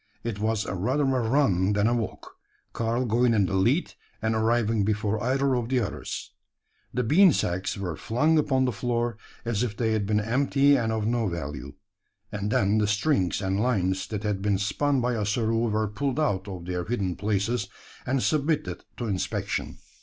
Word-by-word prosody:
It 115 -3 -3
was 110 0 0
rather 125 +11 0
a 130 -4 +1
run 105 -8 +2
than 100 0 +2
a 120 - +3
walk 115 -3 -4 0.4
Karl 115 +2 0
going 120 +1 +2
in 100 -3 +3
the 95 - -3
lead, 120 - +2 0.3
and 110 +1 0
arriving 110 -1 +2
before 105 0 0
either 135 +2 +1
of 120 -1 -2
the 130 -1 +2
others. 105 - -4 0.6
The 125 - -1
bean 175 - +6
sacks 90 -1 -1
were 90 -5 -3
flung 150 - +2
upon 135 -3 +2
the 125 - +1
floor 120 +1 -1 0.3
as 115 -3 0
if 110 -4 -2
they 115 -2 +1
had 105 -2 0
been 105 0 +2
empty 140 +5 +3
and 115 -4 0
of 110 -1 -1
no 115 -1 +1
value 75 -5 -5 0.6
and 105 0 -3
then 100 +1 +2
the 105 - +2
strings 105 - +1
and 95 +1 0
lines 95 -6 0
that 105 -1 -4
had 105 -2 -1
been 100 -1 +1
spun 130 +8 0
by 125 0 0
Ossaroo 115 +2 0
were 110 0 0
pulled 135 +6 -2
out 100 -10 0
of 90 -3 -7
their 90 0 -2
hidden 100 -5 -1
places, 105 +1 -1 0.4
and 130 0 0
submitted 145 - 0
to 120 - -3
inspection. 100 -4 -2
110 Hz, 185 wpm, -26 LUFS, 100-125 Hz, 0.6 s, bean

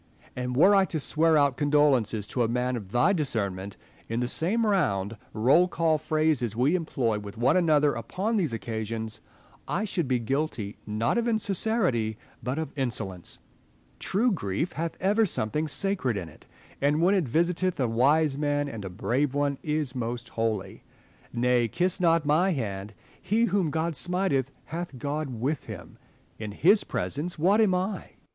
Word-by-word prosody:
And 125 0 -3
were 190 +8 +6
I 195 -1 +5
to 165 -3 -3
swear 160 +2 +3
out 140 -3 +3
condol 145 0 +4
ences 110 -4 0
to 125 - -1
a 115 - +3
man 125 +2 -1
of 100 -5 -7
thy 155 - +3
discernment, 100 - -2 0.3
in 115 +1 -1
the 125 - 0
same 200 - +1
round, 115 - +1 0.2
roll 135 +11 +4
call 165 -3 +1
phrases 155 -7 0
we 130 +7 +2
employ 130 -11 0
with 100 0 -9
one 125 +7 +3
another 150 -5 +3
upon 195 - -2
these 175 - +1
occasions, 110 0 -4 0.5
I 205 +5 -1
should 175 -7 -2
be 130 -1 +2
guilty, 120 -4 -2
not 110 - 0
of 235 - -1
insincerity, 195 - 0 0.2
but 125 +5 -3
of 160 -3 -4
insolence. 110 - -4 0.6
True 230 +6 +1
grief 155 - -2
hath 165 +1 -3
ever 210 +3 +3
something 150 +2 -1
sacred 155 - -1
in 85 -4 -5
it; 75 - -18 0.3
and, 145 +2 +2
when 180 +4 +4
it 185 -8 +1
visiteth 175 +6 +1
a 130 - +2
wise 140 +5 +2
man 145 -1 0
and 115 -7 -6
a 95 - -5
brave 130 +9 -1
one, 145 -1 0
is 150 -4 -1
most 120 -1 -4
holy. 110 -3 -3 0.5
Nay, 120 0 +2
kiss 180 - 0
not 165 -3 +3
my 170 +6 +3
hand: 105 -6 -4 0.3
he 220 +3 +1
whom 190 -5 +1
God 160 +2 -1
smiteth 175 -6 0 0.2
hath 170 -4 -6
God 145 +3 -3
with 130 +5 -2
him. - - -10 0.4
In 105 -2 -5
his 195 - +4
presence 165 +6 -3
what 195 +8 +4
am 205 -4 +4
1 185 +3 0
1 195 - -6
Spenser. - - -20
145 Hz, 175 wpm, -27 LUFS, 115-175 Hz, 0.6 s, were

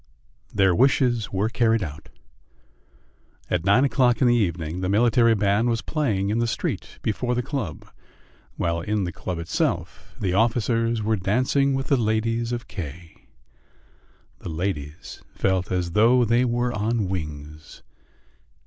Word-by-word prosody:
Their 95 -2 +3
wishes 125 -1 +2
were 100 +2 0
carried 115 -1 +1
out. 80 -1 -8 1.4
At 90 -2 0
nine 100 +8 +4
o'clock 125 -3 +2
in 130 - +4
the 120 - +4
evening 85 -5 -1
the 90 - -1
military 115 +2 +4
band 105 +3 +2
was 115 -1 -1
playing 105 -11 -1
in 110 - 0
the 120 - +1
street 115 - -4
before 125 +3 -1
the 125 - -1
club, 135 -6 -5 0.7
while 85 0 -1
in 105 +3 -1
the 90 - -3
club 90 +2 -5
itself 85 0 -3
the 90 -2 -1
officers 115 +1 +1
were 110 +1 +1
dancing 130 +8 +1
with 135 0 -2
the 140 - +2
ladies 115 +1 0
of 120 -1 -4
K. 85 -3 -9 1.1
The - - -7
ladies 80 -1 -5
felt 95 -2 0
as 90 -2 -1
though 120 +6 +4
they 120 +3 +3
were 120 0 0
on 110 -1 -1
wings. 75 -4 -7
110 Hz, 145 wpm, -24 LUFS, 90-120 Hz, 1.4 s, nine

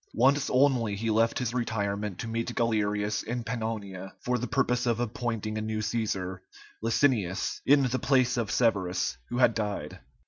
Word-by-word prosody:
Once 135 +4 +3
only 125 -6 +3
he 110 +2 -1
left 115 +1 +2
his 125 -2 -1
retirement 105 -5 -2
to 115 - -5
meet 115 +1 -3
Galerius 105 -2 0
in 120 +1 -4
Pannonia 110 -5 -4
for 125 0 -1
the 125 - -3
purpose 125 -3 +1
of 115 -1 +1
appointing 115 -2 -2
a - - -3
new 110 0 -2
Cæsar, 105 -4 -2 0.4
Licinius, 110 -5 +1
in 140 0 +6
the 130 0 0
place 130 -3 +3
of 115 -4 -1
Severus, 95 - +1
who 120 - -3
had 125 -2 +5
died. 105 -2 -3
115 Hz, 165 wpm, -28 LUFS, 105-125 Hz, 0.4 s, in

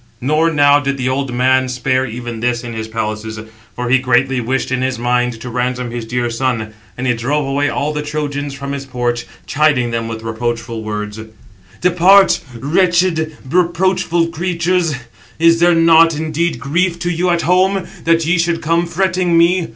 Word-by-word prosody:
Nor 155 +5 +2
now 145 -2 +4
did 140 -1 -2
the 130 -1 -1
old 135 0 -2
man 130 +1 +2
spare 130 +1 0
even 120 0 -6
this 120 +1 -1
in 120 -1 -6
his 110 0 -5
palaces; 110 0 -4 0.4
for 125 0 -3
he 130 +2 +4
greatly 130 0 +1
wished 130 +3 -2
in 130 0 0
his 130 -1 -1
mind 120 0 0
to 125 - -7
ransom 125 0 -2
his 120 -1 -5
dear 120 +1 -1
son. 115 -2 -2 0.2
And 125 - -4
he 125 - +2
drove 135 +5 -1
away 140 +1 0
all 145 +2 -2
the 150 - -2
Trojans 145 -1 -3
from 140 0 -6
his 140 -1 -4
porch, 120 -2 -2 0.2
chiding 140 -5 +1
them 115 -1 -2
with 110 0 -6
reproachful 115 0 -3
words: 105 0 -5 0.6
"Depart, 180 +3 +5 0.2
wretched, 165 +1 +1
reproachful 175 +1 +1
[creatures]; 170 -1 -1 0.4
is 165 +1 +4
there 175 0 +4
not 165 0 +5
indeed 160 -2 -1
grief 170 +7 0
to 175 0 -2
you 175 +2 0
at 170 -1 +1
home, 185 +3 +2 0.2
that 165 0 +2
ye 170 +2 +2
should 165 0 0
come 165 +2 +1
fretting 180 -1 +1
me? 170 +1 +3
140 Hz, 175 wpm, -16 LUFS, 120-165 Hz, 0.6 s, Depart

